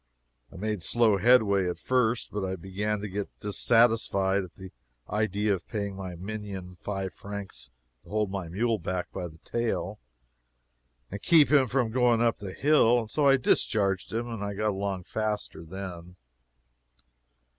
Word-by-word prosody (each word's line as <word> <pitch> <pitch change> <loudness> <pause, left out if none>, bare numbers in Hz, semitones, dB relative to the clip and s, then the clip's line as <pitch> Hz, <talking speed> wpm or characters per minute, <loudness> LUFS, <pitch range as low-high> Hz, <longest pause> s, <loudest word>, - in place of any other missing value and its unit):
I - - -14
made 105 +1 -2
slow 110 +3 +3
headway 100 -4 +4
at 90 - -4
first, 125 -2 +1
but 105 -1 -3
I 95 0 -2
began 100 +4 -3
to 105 - -4
get 100 +1 -4
dissatisfied 105 -3 +3
at 90 - -12
the 95 -1 -10 0.4
idea 105 0 0
of 90 -4 -5
paying 100 -3 -3
my 95 -2 -6
minion 95 -1 -6
five 95 -2 -3
francs 100 -6 -7 0.3
to - - -18
hold 105 -2 0
my 95 -3 -4
mule 110 +5 0
back 90 +1 -3
by 90 -2 -4
the 80 -1 -14
tail 120 -1 -2 1.1
and 100 +1 -6
keep 160 -4 +5
him 140 -3 +5
from 120 -1 0
going 120 -1 +3
up 115 -1 +2
the 100 -3 -6
hill, 135 -5 +4
and 110 -1 -8
so 150 -2 +2
I 135 0 +6
discharged 100 -6 +1
him. 115 +2 -2
I 100 0 -3
got 105 +1 0
along 95 -1 -3
faster 105 -4 -3
then. 90 0 -8
105 Hz, 160 wpm, -28 LUFS, 95-115 Hz, 1.1 s, I